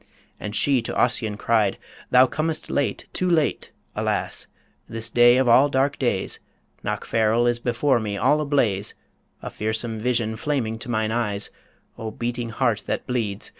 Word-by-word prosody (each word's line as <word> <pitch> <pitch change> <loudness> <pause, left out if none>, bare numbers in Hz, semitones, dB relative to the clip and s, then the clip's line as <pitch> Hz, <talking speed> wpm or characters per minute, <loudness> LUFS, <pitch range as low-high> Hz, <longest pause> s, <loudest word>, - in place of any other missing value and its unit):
And 105 0 -5
she 135 -2 +3
to 115 - -5
Ossian 110 -4 +1
cried, 110 -3 +2 0.3
"Thou 125 +1 +7
comest 155 +5 -3
late 145 - -1
Too 185 - 0
late, 160 -4 +1 0.2
alas! - - -1 0.4
this 115 0 -5
day 120 +1 +6
of 130 -1 +2
all 130 +5 +6
dark 135 +1 +1
days 120 -8 0 0.4
Knockfarrel 115 +1 +1
is 120 0 +1
before 120 +2 +1
me 105 -2 -3
all 145 +7 +3
ablaze 115 -9 0 0.5
A - - -5
fearsome 110 +1 -3
vision 115 -2 0
flaming 115 -4 -2
to 125 - -6
mine 110 -2 0
eyes 105 -3 -1 0.5
O 110 - -4
beating 120 +1 -3
heart 115 - 0
that - - -2
bleeds! 110 -5 -2
120 Hz, 155 wpm, -23 LUFS, 110-130 Hz, 0.5 s, Thou